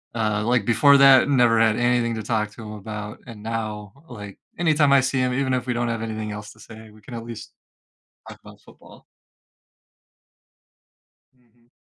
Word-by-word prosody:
uh, 105 -2 -1
like 120 -3 +1
before 140 +5 +5
that, 135 0 +6
never 120 -4 +3
had 110 -1 +3
anything 120 -1 +1
to 110 - -5
talk 105 -1 -1
to 110 - -12
him 105 - -8
about, 105 0 -8
and 110 -3 -11
now, 110 -2 -5 0.2
like, 105 -5 -10 0.2
anytime 155 -4 +2
I 140 - +6
see 130 +1 -1
him, 125 0 0
even 130 0 -1
if 125 0 -2
we 125 - 0
don't 120 0 -2
have 115 -1 -3
anything 110 -1 -5
else 105 0 -8
to 110 - -24
say, 110 0 -13
we 110 0 -19
can 125 - -12
at 115 -1 -6
least 115 -1 -10 0.8
talk - - -11
about - - -15
football. - - -18 2.3
Mhm. 120 -1 -33
115 Hz, 185 wpm, -22 LUFS, 110-125 Hz, 2.3 s, that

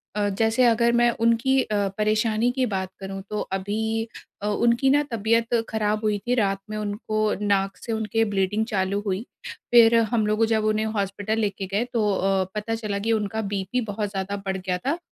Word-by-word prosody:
अ, 205 -1 +1
जैसे 225 +5 +1
अगर 235 0 +4
मैं 240 0 +4
उनकी 230 +4 +3
अ, 205 -2 0
परेशानी 215 +2 +1
की 255 0 0
बात 190 -4 -2
करूँ 195 0 -6
तो 210 - -2
अभी 220 +4 -2 0.3
अ, 205 - -2
उनकी 235 +5 +2
ना 290 +2 +4
तबीयत 230 +1 +1 0.2
ख़राब 215 0 0
हुई 210 -1 +1
थी। 245 - +2
रात 195 -4 +1
में 215 - -4
उनको 210 +1 -3 0.2
नाक 195 -1 +1
से 230 - -6
उनके 220 0 0
ब्लीडिंग 205 +1 0
चालू 200 -2 -1
हुई। 195 +3 -2 0.5
फ़िर 235 -1 +7 0.2
हम 225 -3 +2
लोग 215 +2 +2
जब 220 -1 +1
उन्हें 215 0 +1
हॉस्पिटल 205 0 -2
लेके 200 -2 -2
गए 200 +4 0
तो 215 -3 +2
अ, 190 0 +1
पता 215 +2 -2
चला 210 -3 -3
कि 225 +3 -1
उनका 220 0 -1
बीपी 200 +6 -1
बहुत 205 0 -2
ज़्यादा 195 0 -3
बढ़ 190 0 -1
गया 185 -1 -2
था, 290 +5 +1
215 Hz, 190 wpm, -24 LUFS, 200-225 Hz, 0.5 s, फ़िर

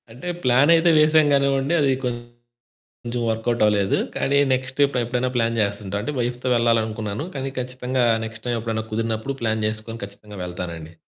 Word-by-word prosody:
అంటే, 125 +9 -9 0.2
ప్లానయితే 150 +7 +5
వేసాం 155 0 +5
గానివ్వండి. 140 +2 +2
అదీ 140 -2 +3
కొంచెం 120 0 -7 0.8
వర్కౌటవలేదు, 110 -3 +1 0.2
కానీ 140 - +1 0.2
నెక్స్ట్ 130 +1 -4
ఎప్పు 140 -2 -3
ఎప్పుడైనా 125 +2 -1
ప్లాన్ 115 -1 +1
జేస్తంటా 100 -1 -2
అంటే, 150 - -3
వైఫ్‌తో 120 +1 -2
వెళ్లాలనుకున్నాను, 110 +1 0
కానీ 135 0 -3
ఖచ్చితంగా 125 0 -2 0.2
నెక్స్ట్ 110 0 -10
టైమెప్పుడన్నా 115 -2 -2
కుదిరినప్పుడు 115 +4 -2
ప్లాన్ 110 -1 0
జేసుకొని 110 +1 -6
ఖచ్చితంగా 100 +1 -12
వెళ్తానండి. 85 -2 -6
120 Hz, 135 wpm, -22 LUFS, 110-130 Hz, 0.8 s, ప్లానయితే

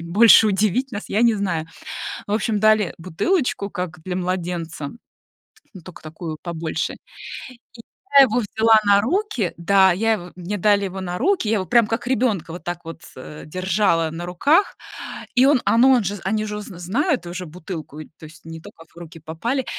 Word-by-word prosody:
и - - -8
больше 215 +6 +6
удивить 215 +6 0
нас, 205 - -5
я 215 - +1
не 235 -1 +4
знаю. 180 -6 -2 0.6
Ну - - -2
в - - +4
общем, 215 -2 -1
дали 215 -3 +3
бутылочку 200 - -1
как 180 -3 -5
для 180 -1 -3
младенца, 175 -4 -3 0.8
ну, 185 - -11
тока 180 +1 -13
такую 160 0 -7
побольше. 165 -2 -3 0.6
И 235 -1 -17 0.4
я 275 - +11
его 245 -1 +1
взяла 220 0 +3
на 200 0 +5
руки 270 - -1
да, 190 +2 +4
я 225 +5 +1
его 175 -4 -6
мне 185 +3 -5
дали 200 +1 +2
его 190 0 -6
на 180 -1 -4
руки, 375 - +1
я 225 - +2
его 190 -3 -1
прямо 235 +2 +4
как 230 +2 -3
ребёнка 230 -9 0
вот 175 - -9
так 175 0 -4
вот, 165 0 -9
э, 150 +4 -10
держала 185 -1 0
на 170 +2 -6
руках. 285 - +2 0.6
И 255 +2 +5
он, 275 -3 +4
а, 230 - +3
ну, 260 +3 +6
он 245 -4 +3
же 200 +2 -3
они 215 +2 0
же 210 0 -5
уже 210 - -6
зн 180 - -10
знают 245 - -1
уже 180 +1 -6
бутылку, 160 -2 -8
и 155 - -8
эт - - -34
то - - -11
есть 155 +1 -15
не 165 0 -9
только 165 +1 -14
в 165 - -26
руки 165 -1 -11
попали. 165 - -3
И - - -14
190 Hz, 205 wpm, -21 LUFS, 170-225 Hz, 0.8 s, я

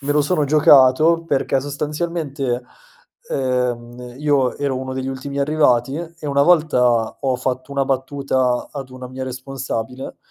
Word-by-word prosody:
me 145 +1 -1
lo 150 - +3
sono 150 +1 +1
giocato 150 +2 +5
perché 135 -3 0
sostanzialmente, 145 -3 -3 0.7
ehm, 125 -1 -2
io 145 -4 +1
ero 140 -2 -1
uno 130 0 -5
degli 130 0 -3
ultimi 140 +1 -5
arrivati 140 -3 +2
e 165 -2 -7
una 140 0 +2
volta 125 -9 +3
ho 130 -2 0
fatto 130 +2 -3
una 140 -1 +1
battuta 130 -2 0
ad 135 -3 -7
una 130 0 -9
mia 130 0 -6
responsabile, 130 -1 -5
135 Hz, 140 wpm, -20 LUFS, 130-145 Hz, 0.7 s, giocato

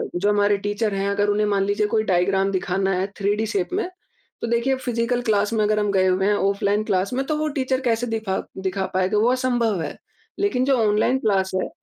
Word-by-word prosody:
जो 195 +4 +1
हमारे 205 0 +3
टीचर 205 +1 -2
हैं 195 0 -1
अगर 205 +1 +1
उन्हें 210 +1 +2
मान 200 -1 +1
लीजिए 205 +1 +1
कोई 215 +1 +1
डायग्राम 195 0 +1
दिखाना 190 0 0
है 190 - -1
थ्री 200 0 +1
डी 220 +1 -1
शेप 200 -4 -1
में। 395 0 0 0.5
तो - - -2
देखिए 235 +3 +1
फिजिकल 245 -1 -1
क्लास 210 -2 +1
में 220 -1 +2
अगर 210 0 +2
हम 205 -1 0
गए 190 -1 +2
हुए 185 +1 +1
हैं, 210 - +3
ऑफलाइन 200 +1 +1
क्लास 195 0 -1
में 265 +2 0
तो 310 - -1
वो 310 0 -1
टीचर 260 -1 0
कैसे 240 -1 0
दिखा 220 -4 -2 0.2
दिखा 190 0 -2
पाएगा 190 +3 +1
वो 225 +4 +3
असंभव 240 -6 0
है। - - -5 0.4
लेकिन 385 -11 +1
जो 270 0 +3
ऑनलाइन 215 +5 +2
क्लास 195 -5 +1
है, 185 - -1
210 Hz, 225 wpm, -22 LUFS, 195-235 Hz, 0.5 s, हमारे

